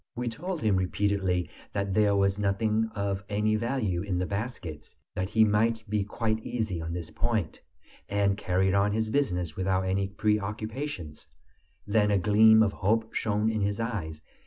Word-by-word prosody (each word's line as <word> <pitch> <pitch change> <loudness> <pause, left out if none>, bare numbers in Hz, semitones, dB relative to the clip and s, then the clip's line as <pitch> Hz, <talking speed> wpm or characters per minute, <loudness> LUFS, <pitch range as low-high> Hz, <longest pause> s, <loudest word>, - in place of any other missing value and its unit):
We 120 0 -2
told 175 +8 -5
him 105 -3 +2
repeatedly 95 -2 0 0.3
that 100 -1 -1
there 105 0 +3
was 100 0 +2
nothing 110 +2 +1
of 100 -1 -2
any 105 +1 +1
value 110 -6 -1
in 100 -2 -2
the 90 - 0
baskets, 100 -7 -5 0.2
that 95 +1 -2
he 110 +1 +4
might 110 +2 +1
be 105 -1 0
quite 110 +1 -2
easy 110 -8 -2
on 80 0 -4
this 85 -2 -5
point, 110 -9 -2 0.5
and 100 -1 +2
carry 95 -1 +1
on 100 +1 +2
his 110 0 -1
business 90 - 0
without 95 0 0
any 95 +1 0
preoccupations. 105 - -3 0.6
Then 105 0 +2
a 100 - +3
gleam 110 +3 +6
of 100 -2 0
hope 110 +3 0
shone 105 0 0
in 110 -1 0
his 100 +1 -1
eyes. 85 -10 -4
105 Hz, 165 wpm, -28 LUFS, 95-110 Hz, 0.6 s, gleam